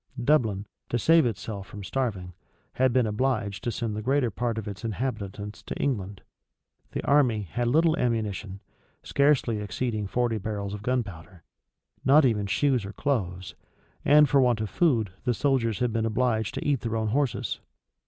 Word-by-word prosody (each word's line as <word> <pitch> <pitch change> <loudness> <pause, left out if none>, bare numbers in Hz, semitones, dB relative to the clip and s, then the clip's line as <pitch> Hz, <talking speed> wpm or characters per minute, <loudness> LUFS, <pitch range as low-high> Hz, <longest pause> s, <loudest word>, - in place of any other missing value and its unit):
Dublin, 110 -8 +2 0.2
to 120 - 0
save 160 +3 +5
itself 105 -2 -5
from 100 -1 -9
starving, 100 -5 -3 0.4
had 130 0 +2
been 125 -1 +3
obliged 105 -2 -1
to 120 - -1
send 115 -2 -3
the 105 - -3
greater 130 0 +1
part 115 +2 -2
of 110 -1 -4
its 100 -2 -7
inhabitants 105 -3 -4
to - - -6
England. 100 -8 -2 0.7
The - - -3
army 125 -7 +3
had 120 +7 -2
little 160 +5 +3
ammunition, 105 - -2 0.4
scarcely 140 -6 +2
exceeding 105 +1 -2
forty 120 +1 0
barrels 100 -1 -4
of 105 - -6
gunpowder; 100 -8 -3 0.6
not 140 +3 +6
even 105 -5 +1
shoes 130 +3 +1
or 100 +1 -7
clothes; 90 -10 -2 0.5
and 150 +1 +6
for 140 0 +4
want 120 -3 +3
of 110 -2 -3
food, 120 - +2
the 120 - +1
soldiers 125 -6 +1
had 125 -2 0
been 115 -1 0
obliged 110 -2 0
to - - -4
eat 140 -3 +2
their 115 -1 -2
own 110 -1 -1
horses. 135 +2 -1
115 Hz, 165 wpm, -27 LUFS, 100-130 Hz, 0.7 s, not